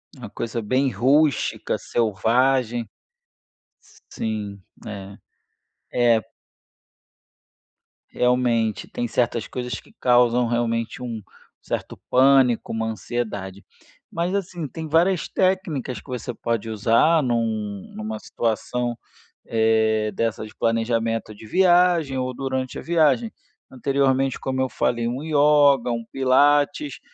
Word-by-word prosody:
Uma - - -9
coisa 115 0 -4
bem 130 +6 +1
rústica, 135 +6 +1
selvagem. 120 +2 +1 1.2
Sim, 105 -3 -4 0.2
é, 100 -1 -8 1.0
é. 110 - -2 1.8
Realmente, 120 -4 +1
tem 120 - -3
certas 120 -1 -1
coisas 125 -2 -5
que - - -20
causam, 125 0 +4
realmente, 115 0 -1
um 115 -3 -5 0.4
certo - - -5
pânico, 130 -2 +4
uma 110 0 -2
ansiedade, 105 -4 -4 0.5
mas, 175 +3 -1
assim, 175 -5 -3
tem 160 +3 -7
várias 170 +3 +2
técnicas 170 -9 -1
que - - -20
você 125 -1 -4
pode 115 -1 -3
usar 115 +9 +3
num 110 -5 -2
numa 110 0 -5
situação, 120 +2 -2 0.5
eh, 110 -1 +2
dessa 115 +1 -2
de 110 - -12
planejamento 115 -1 -1
de 105 - -13
viagem 175 - +3
ou 130 0 -2
durante 130 -1 -3
a - - -5
viagem, 170 - +2 0.4
anteriormente, 135 0 +1
como 130 0 -2
eu 130 - 0
falei, 120 0 -1
um 125 +5 -3
yoga, 145 -4 +4
um 115 -1 -3
pilates 145 - +2
120 Hz, 110 wpm, -23 LUFS, 115-140 Hz, 1.8 s, causam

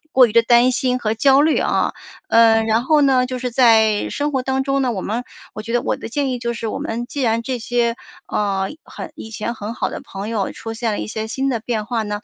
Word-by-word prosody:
过 255 -1 +7
于 - - -7
地 230 +1 +5
担 240 +2 +5
心 255 -1 0
和 215 -2 0
焦 270 +4 +4
虑 310 +1 +3
啊。 - - +1 0.4
嗯， 225 -1 +5
然 225 +2 +1
后 305 +2 +4
呢， 260 -2 +3
就 255 0 -5
是 250 0 -2
在 225 -4 +4
生 290 +1 -1
活 265 -2 0
当 265 +1 0
中 275 0 +1
呢， 255 - +1
我 195 - -3
们 235 +4 -3 0.3
我 215 - -6
觉 230 - -6
得 240 0 +1
我 - - -1
的 - - -8
建 275 +2 -1
议 250 - -2
就 235 0 -2
是， 230 -1 -5
我 - - -3
们 235 +2 -3
既 285 - -5
然 230 -1 +1
这 255 +1 -3
些， 235 0 0 0.3
呃， 195 -2 -1 0.2
很 - - -8
以 220 - -9
前 220 +1 -4
很 220 +1 -6
好 - - -1
的 - - -6
朋 195 +2 -7
友 220 -4 -2
出 225 - -7
现 225 -1 -2
了 - - -3
一 - - -4
些 220 0 -4
新 265 +5 -2
的 245 - 0
变 220 -2 -3
化 235 -2 -1
呢， 205 0 -4
235 Hz, 280 characters per minute, -20 LUFS, 220-255 Hz, 0.4 s, 过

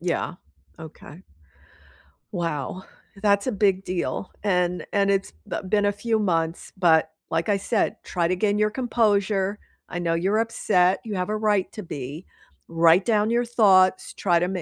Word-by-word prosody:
Yeah, 175 0 -2 0.4
okay. 160 +1 -12 1.1
Wow, 170 -1 -3 0.4
that's 200 +2 +2
a - - +1
big 195 -3 +1
deal, 185 +1 -3
and 180 -3 0
and 200 -1 +2
it's 195 - -1
the - - -4
been 205 +2 +1
a 205 - +3
few 220 +2 -1
months, 165 -4 -1
but 160 -3 +3 0.2
like 165 +4 -1
I 205 - +3
said, 205 +2 0
try 175 -2 -1
to 185 - 0
gain 205 +2 +1
your 210 0 +2
composure. 210 -4 0 0.3
I 175 - -4
know 170 -1 0
you're 195 +6 +1
upset, 190 -5 +2
you 215 -3 -5
have 180 0 -2
a 215 - -1
right 210 -3 +1
to 210 - -7
be. 145 +1 -7 0.4
Write 165 +2 +4
down 215 -2 +2
your 240 +1 +1
thoughts, 190 -6 +3
try 175 -3 +1
to 175 - 0
ma 185 -1 -3
190 Hz, 170 wpm, -24 LUFS, 175-210 Hz, 1.1 s, Write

